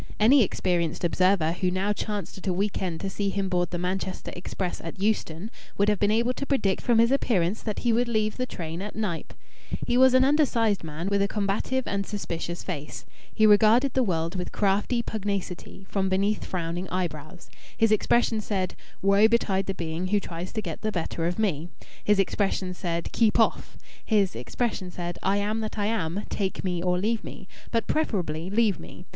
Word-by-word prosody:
Any 250 +6 +6
experienced 175 -6 0
observer 180 -1 +3
who 180 +1 0
now 190 +3 0
chanced 205 -3 -4
at 190 - -8
a 185 - +2
week 195 +3 -1
end 175 -4 -3
to 195 - -2
see 200 0 -1
him 195 -1 -1
board 175 -1 +1
the 175 - -3
Manchester 185 +1 -3
express 180 0 -4
at 165 +2 -7
Euston 205 -1 -1 0.3
would 200 +1 +3
have 210 -2 +1
been 205 - +3
able 235 +3 +2
to 280 - -4
predict 205 -9 +1
from 240 -2 +3
his 230 +2 +5
appearance 210 -8 +1
that 215 -2 -3
he 235 - +4
would 240 +2 +2
leave 215 -2 0
the 255 0 -1
train 165 -3 -5
at 205 +1 -6
Knype. 195 -7 -3 0.5
He 240 - +1
was 260 0 +6
an 260 - +6
undersized 245 - +2
man, 160 +3 -5
with 200 0 +2
a 200 - +3
combative 210 +6 -1
and 200 0 -1
suspicious 175 -4 -4
face. 150 -5 -6 0.3
He 220 - +3
regarded 220 +5 +5
the 260 - +3
world 170 -7 0
with 180 -1 -4
crafty 210 +4 +1
pugnacity 195 -3 -4
from 190 -1 0
beneath 200 +3 +1
frowning 175 +1 -3
eyebrows. 175 -1 -4 0.3
His 225 -1 +3
expression 220 +1 +3
said: 195 -3 -2 0.3
"Woe 200 +2 +6
betide 200 -4 +1
the 195 - -2
being 165 +1 -3
who 205 +2 +2
tries 175 -1 -6
to 215 - -2
get 165 -4 -5
the 215 - -1
better 165 -2 -2
of 175 - -2
me!" 175 -7 0 0.3
His 210 0 +3
expression 195 -1 0
said: 170 -2 -3
"Keep 225 -1 +3
off!" 225 - +1 0.3
His 205 - +2
expression 185 - -2
said: 175 -1 -5
"I 195 +1 +2
am 210 +2 0
that 220 0 -4
I 205 - 0
am. 205 -3 -1
Take 195 -2 -2
me 180 -2 -1
or 180 0 +1
leave 215 +4 0
me, 190 - -9 0.2
but 230 -1 0
preferably 180 - -1
leave 210 -3 +2
me. 180 - -11
195 Hz, 195 wpm, -26 LUFS, 180-215 Hz, 0.5 s, Any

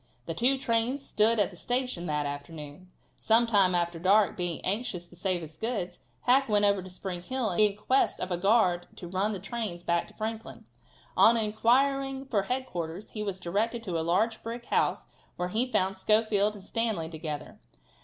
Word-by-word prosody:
The 165 - -3
two 250 +10 +2
trains 255 +2 0
stood 220 +2 +3
at 205 - +2
the - - -13
station 245 -3 -2
that 150 -1 -1
afternoon. 145 +4 -7 0.3
Some 225 +2 +4
time 200 -5 +3
after 170 -1 -1
dark, 195 +4 +4
being 175 -3 -2
anxious 190 -4 -2
to 175 - -15
save 180 -1 -1
his 155 0 -11
goods, 200 -6 -3 0.2
Hack 265 +1 +3
went 205 -1 +3
over 200 -1 +3
to 185 - -9
Spring 180 -1 -5
Hill 255 +2 -1
in 205 +2 +3
quest 255 +6 +1
of 185 - -4
a 175 - +1
guard 185 -3 +3
to 175 - -8
run 190 +4 0
the 200 - -4
trains 195 -3 -5
back 170 0 0
to - - -17
Franklin. 220 0 -5 0.5
On 230 +1 +6
inquiring 265 +5 +2
for 220 -7 +1
headquarters 195 -6 -4
he 215 - -4
was 200 -3 -2
directed 215 +7 -1
to 175 -6 -2
a - - 0
large 200 +7 +1
brick 235 +1 -6
house - - +1 0.3
where 180 0 -2
he 240 +6 0
found 195 -3 +1
Schofield 215 +1 +2
and 195 -2 -12
Stanley 220 -9 -1
together. 155 -2 -6
200 Hz, 185 wpm, -28 LUFS, 175-230 Hz, 0.5 s, On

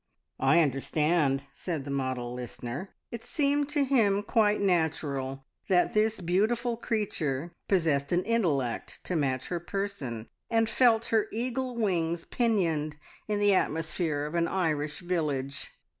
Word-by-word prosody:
"I 135 +6 +5
understand," 145 0 +1
said 160 -7 -4
the 140 - -4
model 130 -3 -2
listener. 125 - -6 0.2
It 235 -1 -6
seemed 290 -1 +1
to 290 -1 +2
him 215 -7 +3
quite 210 0 +3
natural 145 -7 0 0.2
that 180 -2 +3
this 215 -1 +2
beautiful 220 +7 +1
creature 175 - -2
possessed 155 -7 +2
an 175 +1 +2
intellect 165 - 0
to 180 - -3
match 130 -4 0
her 175 - -1
person, 170 - -4 0.2
and 225 -1 +3
felt 230 0 +4
her 220 -1 +3
eagle 250 +2 -2
wings 170 -6 0
pinioned 165 -11 0 0.3
in 210 -1 0
the 205 -1 +4
atmosphere 160 -3 0
of 150 - -5
an 170 -1 +2
Irish 155 -4 -1
village. 150 -6 -2
175 Hz, 135 wpm, -29 LUFS, 145-215 Hz, 0.3 s, I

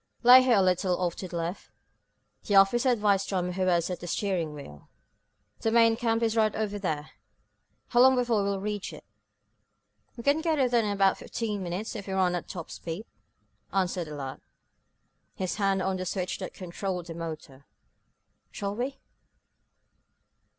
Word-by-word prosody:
"Lay 250 +2 +10
her 255 -1 +3
a 200 - +4
little 180 0 +1
off 175 -2 -1
to 185 - -5
the 175 - -5
left," 170 +3 -4 0.8
the 205 - +2
officer 235 +7 +5
advised 205 -5 +2
Tom 180 -2 -1
who 185 +1 -1
was 170 -2 +2
at 180 - -4
the 175 - -8
steering 175 -3 -1
wheel. 75 - -11 0.7
"The 225 - 0
main 230 0 +5
camp 230 -1 0
is 225 -1 +1
right 215 -2 +2
over 205 -1 -2
there. 155 -6 -3 0.8
How 240 - +2
long 260 +1 +7
before 240 -4 +1
we 200 - 0
will 200 -1 -1
reach 205 0 -4
it?" - - -11 1.1
"We 235 - -7
can 285 +4 +3
get 325 -1 +1 0.2
there 235 -2 +3
in 210 - -1
about 195 -1 +2
fifteen 210 -3 -3
minutes, 185 +6 -4
if 205 -2 -6
we 190 - -3
run 185 -2 +2
at 175 - -3
top 170 -3 -7
speed," 170 +6 -6 0.7
answered 185 -2 0
the 150 - -7
lad, 135 -2 -6 0.9
his 185 -4 -3
hand 195 -2 +1
on 190 0 0
the 185 - -4
switch 185 0 -3
that - - -6
controlled 180 0 -4
the 170 - -7
motor. 155 -4 -8 0.8
"Shall 200 0 -4
we?" 260 +4 -3
195 Hz, 175 wpm, -28 LUFS, 175-220 Hz, 1.1 s, Lay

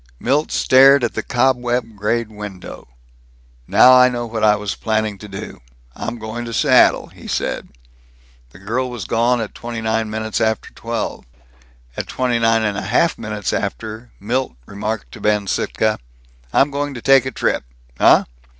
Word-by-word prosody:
Milt 145 +5 0
stared 135 +1 +5
at 120 - 0
the 110 - -2
cobweb 120 -2 0
grayed 110 +2 -1
window. 105 -3 -9 0.8
"Now 130 - +7
I 125 0 +7
know 120 -1 -3
what 110 -1 -4
I 105 -1 +5
was 105 -1 -3
planning 110 -2 -2
to 105 - -10
do. 95 -10 -8 0.3
I'm 120 - -5
going 110 +2 -6
to 115 - -6
Seattle," - - +4
he - - -13
said. - - -3 0.8
The 60 - -16
girl 120 +7 -2
was 120 -6 -6
gone 120 +3 +1
at 110 - -5
twenty 120 -1 -6
nine 110 0 -1
minutes 110 0 -3
after 110 -2 -1
twelve. - - -4 0.7
At - - -4
twenty 125 -2 0
nine 115 -1 +3
and 105 -1 -1
a - - -5
half 125 - +1
minutes 105 -2 -3
after, 110 +3 -4
Milt 120 - -2
remarked 100 - -5
to - - -11
Ben 105 -1 +1
Sittka, 110 +2 -1 0.5
"I'm 140 +1 +3
going 145 0 -3
to 120 - -7
take 135 -1 +5
a - - -3
trip. - - -1 0.4
Uh? - - +6
115 Hz, 170 wpm, -19 LUFS, 105-125 Hz, 0.8 s, Now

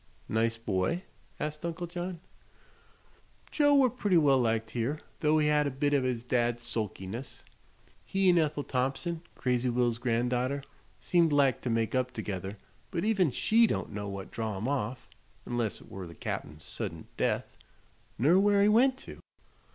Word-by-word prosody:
"Nice 115 +1 +1
boy?" 115 - -1 0.4
asked 150 +1 -4
Uncle 170 +1 -3
John. 175 0 -5 1.3
"Joe 290 -1 +4
were 270 -2 +6
pretty 205 -7 +2
well 140 -4 +5
liked 115 -2 0
here, 125 +5 -1 0.2
though 155 0 +3
he 155 - +3
had 150 -1 +3
a - - +1
bit 145 +2 0
o' 140 - +4
his 125 -2 -1
dad's 120 -1 0
sulkiness. 110 +1 -5 0.6
He 195 0 +1
'n' 175 -1 +6
Ethel 150 -2 0
Thompson 135 +7 -2
crazy 125 0 0
Will's 120 -1 +1
gran'daughter 125 +3 0 0.3
seemed 170 -3 +2
like 140 -3 +3
to 125 - -2
make 115 -1 0
up 130 -1 0
together; 100 -2 -4 0.3
but 170 - -2
even 200 -7 +3
she 225 - +4
don't - - -2
know 100 -1 -4
what 100 -1 -7
drav 110 -3 -3
him 110 +6 -3
off 130 -3 -2 0.4
'nless 120 -3 -1
it - - -16
were 95 -2 -6
the 85 - -11
Cap'n's - - -5
suddint 80 -1 -5
death - - -1 0.6
ner 160 +10 +5
where 200 0 +4
he 205 - +5
went 255 +5 +4
to." - - -10
130 Hz, 165 wpm, -30 LUFS, 115-170 Hz, 1.3 s, were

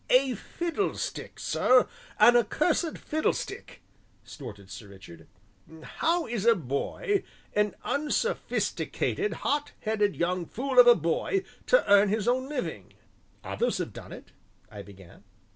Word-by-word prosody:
"A 255 0 +4
fiddlestick, 345 - -4
sir 255 0 +3 0.3
an 240 +3 +7
accursed 305 - +1
fiddlestick!" 315 +1 -3 0.4
snorted 100 -9 -10
Sir 100 +2 -9
Richard. 95 -5 -14 0.6
"How 335 +1 0
is 225 -4 -3
a 230 - +7
boy, 165 - -2 0.3
an 210 0 +1
unsophisticated, 400 +5 -1
hot 290 0 0
headed 210 -3 0
young 175 0 -1
fool 260 +1 0
of 245 - +9
a 240 - +9
boy 230 - -1 0.2
to - - +4
earn 200 0 +6
his 215 +1 -1
own 260 +2 +1
living?" 165 - -5 0.5
"Others - - -1
have - - -4
done - - -10
it," - - -11 0.4
I 105 -2 -8
began. 95 -3 -15
230 Hz, 125 wpm, -28 LUFS, -, 0.6 s, of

